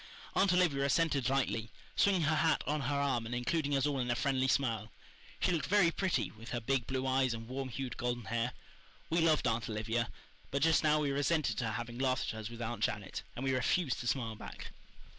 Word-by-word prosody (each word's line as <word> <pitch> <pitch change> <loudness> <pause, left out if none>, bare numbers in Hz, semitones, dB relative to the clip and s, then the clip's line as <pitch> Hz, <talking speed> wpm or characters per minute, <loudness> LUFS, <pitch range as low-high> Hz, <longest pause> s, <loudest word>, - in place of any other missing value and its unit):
Aunt 195 -1 +4
Olivia 175 -7 +3
assented 140 -3 +2
lightly, 115 -5 0 0.3
swinging 190 -4 +3
her 155 +1 +2
hat 160 +1 +2
on 150 0 0
her 145 +1 -1
arm 135 -5 0
and 120 - -3
including 145 +3 0
us 135 0 +2
all 145 -2 0
in 125 -1 -1
a 120 - +2
friendly 130 0 +1
smile. 115 -5 +1 0.5
She - - +2
looked 165 -3 0
very 195 -4 +4
pretty, 190 0 0
with 115 +2 -11
her 120 - -2
big 125 0 0
blue 130 0 -1
eyes 130 -2 +2
and 115 0 -8
warm 130 +1 -4
hued 130 0 -5
golden 120 -2 -2
hair. 115 +4 -1 0.6
We 165 +1 +3
loved 155 -5 +3
Aunt 115 0 0
Olivia; 110 +2 -1 0.4
but 140 +1 0
just 160 0 +4
now 155 0 +4
we 145 -2 0
resented 145 -4 +1
her 115 -3 -1
having 120 +2 -5
laughed 130 -2 +1
at 110 - -6
us 110 0 -5
with 120 0 -6
Aunt 115 -1 -3
Janet, 100 -2 -2
and 130 - -4
we 135 - +2
refused 130 +2 +1
to 120 - -4
smile 115 -1 0
back. - - -9
130 Hz, 215 wpm, -33 LUFS, 115-150 Hz, 0.6 s, Aunt